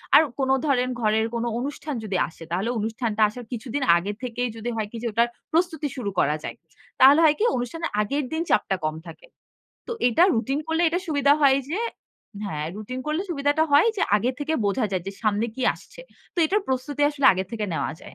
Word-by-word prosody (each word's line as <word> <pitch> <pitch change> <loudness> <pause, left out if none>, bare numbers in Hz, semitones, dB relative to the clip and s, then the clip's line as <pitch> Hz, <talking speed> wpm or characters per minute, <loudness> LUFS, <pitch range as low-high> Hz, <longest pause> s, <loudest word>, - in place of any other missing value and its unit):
আর - - +10 0.2
কোনো 265 0 +2
ধরেন 255 -3 +2
ঘরের 220 0 +2
কোনো 235 0 -1
অনুষ্ঠান 285 +2 -4
যদি 195 -3 -2
আসে, 165 0 -13
তাহলে 190 +6 -1
অনুষ্ঠানটা 220 0 -2
আসার 240 +2 -9
কিছুদিন 245 +4 -3
আগে 185 +4 -3
থেকেই, 245 0 -2
যদি 225 +2 -4
হয় 220 -2 -2
কি? 235 - -7
যে, - - 0
ওটার 230 +3 +3 0.3
প্রস্তুতি 325 -3 +1
শুরু 220 -6 -2
করা 150 +2 +2
যায়। - - -5 0.4
তাহলে 275 +4 +8
হয় 305 -1 +5
কি? - - +1
অনুষ্ঠানের 290 +8 -3
আগের 280 +7 -1
দিন 320 - -1
চাপটা 195 -2 +2
কম 155 0 -1
থাকে। 165 - -12 0.6
তো - - -5 0.2
এটা 250 +9 +4
রুটিন 260 +5 0
করলে 320 +1 0
এটা 345 +2 0
সুবিধা 285 -2 +4
হয় 275 -2 +6
যে 355 +7 -1 0.7
হ্যাঁ, 155 -5 -3
রুটিন 215 +5 -6
করলে 305 +3 0
সুবিধাটা 290 -1 +1
হয় 290 +10 +6
যে, 395 - 0 0.2
আগে 245 +5 0
থেকে 300 +2 -1
বোঝা 210 +4 +1
যায় 185 -2 -1
যে - - -3
সামনে 215 +1 +1
কি 260 - -5
আসছে? - - -14 0.3
তো - - -31
এটার 410 +6 +1
প্রস্তুতি 265 +3 -2
আসলে 285 -2 -1
আগের 190 0 -3
থেকে 220 -2 -2
নেওয়া - - -1
যায়। 160 - -16
250 Hz, 205 wpm, -24 LUFS, 215-290 Hz, 0.7 s, আর